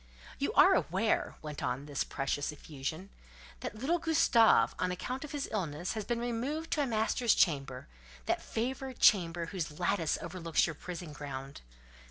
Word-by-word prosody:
"You - - 0
are - - +7
aware," - - +1
went 150 -1 -6
on 130 0 -2
this 145 -2 -1
precious 140 +2 -2
effusion, 150 +5 -6 0.5
"that - - -5
little 285 +10 0
Gustave, 305 -9 +4
on 180 - 0
account 250 - -4
of 300 - -7
his 290 -2 -3
illness, 175 -4 -2
has 215 -2 -4
been 240 -1 -1
removed 250 +7 -3
to 300 - +2
a 280 - +1
master's 225 0 +2
chamber—that 65 - -1
favoured 260 +2 -3
chamber, 170 -4 +4
whose 165 -4 -5
lattice 175 -2 +1
overlooks 170 -1 0
your 160 - -3
prison 175 0 -7
ground. 140 -1 -7
175 Hz, 155 wpm, -32 LUFS, 145-235 Hz, 0.5 s, are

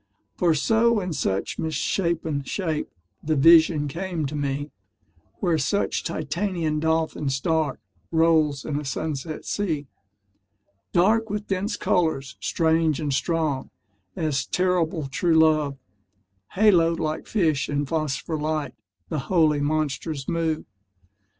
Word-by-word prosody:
For 170 -3 +2
so 225 +8 +3
in 180 -3 -3
such 95 -9 -2
misshapen 160 -1 -1
shape 160 +1 -2 0.3
The 155 +1 0
vision 160 0 +6
came 170 +1 -3
to 145 +2 -4
me, 145 0 -2 0.7
Where 170 -5 +2
such 200 +9 0
titanian 165 0 -2
dolphins 160 -4 0
dark 160 +1 0 0.3
Roll 160 -3 +3
in 145 -1 -2
a - - -6
sunset 150 +2 -4
sea: 160 -8 -2 1.1
Dark 220 +5 +3
with 210 0 -3
dense 200 +2 -2
colours, 140 -9 0
strange 160 +6 +1
and 145 -3 -1
strong 155 -2 -1 0.5
As 150 -4 0
terrible 180 -4 0
true 160 +5 +1
love, 155 -3 +3 0.8
Haloed 175 -5 +4
like 155 -1 -3
fish 160 -10 +1
in 145 0 0
phospher 155 0 -2
light 150 -3 -2 0.4
The 155 - -2
holy 155 -5 +3
monsters 150 -1 -2
move. 165 -2 -1
160 Hz, 120 wpm, -24 LUFS, 145-170 Hz, 1.1 s, vision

